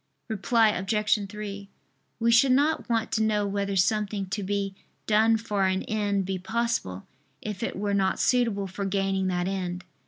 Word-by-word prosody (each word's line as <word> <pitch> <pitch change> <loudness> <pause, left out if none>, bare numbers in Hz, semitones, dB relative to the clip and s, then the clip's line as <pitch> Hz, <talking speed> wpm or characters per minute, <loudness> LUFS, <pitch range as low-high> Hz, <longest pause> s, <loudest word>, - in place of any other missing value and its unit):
Reply 220 +1 +3
Obj. 210 +1 0
3: 200 -1 -7 0.5
We 230 0 +3
should 255 +3 +5
not 290 +1 +1
want 230 -1 0
to 220 - +1
know 210 -1 +1
whether 200 0 -2
something 200 +1 +1
to 205 - -2
be 200 0 -2 0.3
done 220 +1 +4
for 205 -4 0
an 190 0 0
end 205 -3 -1
be 190 0 -3
possible, 190 - -2 0.3
if 210 -3 -6
it - - -2
were 200 +1 -1
not 190 -1 +1
suitable 230 -6 +2
for 195 +1 -5
gaining 195 -1 0
that 180 -1 -1
end. 180 -2 -3
200 Hz, 165 wpm, -26 LUFS, 195-220 Hz, 0.5 s, should